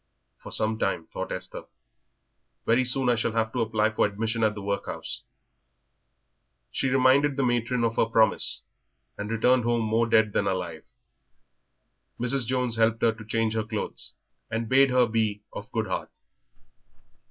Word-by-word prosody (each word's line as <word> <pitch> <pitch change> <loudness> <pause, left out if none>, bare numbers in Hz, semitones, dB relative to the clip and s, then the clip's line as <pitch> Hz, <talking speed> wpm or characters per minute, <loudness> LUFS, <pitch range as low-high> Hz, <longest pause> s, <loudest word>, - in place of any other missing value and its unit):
"For - - -10
some 110 0 +1
time," 85 -4 -1
thought - - -4
Esther; - - -5 1.0
"very 120 +3 +3
soon 130 +1 +2
I 120 - +5
shall 115 -1 -1
have 110 -1 0
to 125 - 0
apply 110 -1 +1
for 110 - +1
admission 110 +3 -2
at 105 -1 +2
the 105 - -6
workhouse." 100 0 -4 1.5
She 135 - 0
reminded 135 +2 +4
the 135 - +2
matron 120 0 0
of 115 0 0
her - - +4
promise, 110 -1 +2 0.5
and 105 +1 -5
returned 125 +2 +3
home 120 0 +1
more 115 +2 +1
dead 110 -2 +4
than 100 - +1
alive. 90 -4 -3 1.3
Mrs. 125 0 +1
Jones 125 -2 0
helped 115 0 +2
her 115 - +5
to 110 0 -11
change 110 0 0
her 110 -1 0
clothes, 105 - -4 0.4
and 115 0 -2
bade 135 +3 +5
her 125 -1 +4
be 110 -2 -1
of - - -8
good - - -1
heart. - - -3
115 Hz, 160 wpm, -26 LUFS, 110-125 Hz, 1.5 s, I